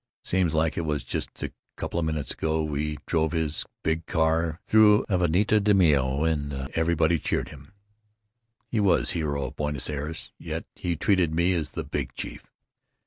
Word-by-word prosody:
Seems 90 -4 +1
like 80 +1 +1
it - - +1
was 75 -3 -2
just - - -3 0.5
couple 85 - -2
minutes 80 -3 -2
ago 80 0 0
we 75 0 -2
drove 80 -1 0
in 80 - +2
his 75 -1 -3 0.2
big 80 0 -1
car 80 -1 +1
through 105 -1 +6
Avenida 95 +4 +3
de 105 0 +3
Mayo 70 -6 +3
and 75 -3 0 0.2
everybody 80 0 +2
cheered - - -1
him, 75 +3 -13 0.9
he 115 - -2
was 100 -3 +3
hero 70 -4 -1
of - - -7
Buenos 75 -1 -1
Aires, 75 +2 -5
yet - - -5
he 85 -1 -2
treated 85 -2 +2
me 85 +3 +3
as 80 -4 -1
the - - -1
Big - - -4
Chief. - - -6
80 Hz, 165 wpm, -26 LUFS, 75-85 Hz, 0.9 s, through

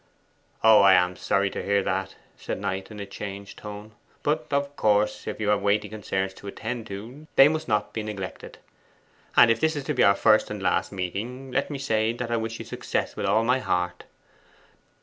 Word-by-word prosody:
'Oh, 110 -1 +8
I 100 -1 +7
am 90 0 +2
sorry 100 +1 0
to - - -4
hear 100 0 +1
that,' 95 0 -2 0.2
said - - -5
Knight, 95 -1 -3
in 105 -1 -9
a 100 - -4
changed 100 0 -8
tone. 105 +1 -8 0.3
'But 150 +1 0
of 140 0 -1
course, 105 -2 +1
if - - -4
you 105 -1 0
have 105 -1 +2
weighty 105 +1 +1
concerns 95 -3 -3
to 100 - -12
attend 115 +3 -5
to, 115 +10 -9
they 135 - +9
must 155 +1 -2
not 105 -3 0
be 110 - -2
neglected. 105 -3 -7 0.8
And 120 - +8
if 115 - +1
this 160 +3 +1
is 145 - -3
to 150 - -2
be 125 - +1
our 100 - +6
first - - +4
and - - -5
last - - 0
meeting, 115 +8 -5
let 135 - 0
me 145 - -4
say 110 -4 0
that 120 0 -5
I 115 - +2
wish 115 0 -3
you - - -8
success - - -3
with - - -2
all 110 - +3
my 125 +3 +2
heart! 90 -6 -2
105 Hz, 210 wpm, -25 LUFS, 100-125 Hz, 0.8 s, they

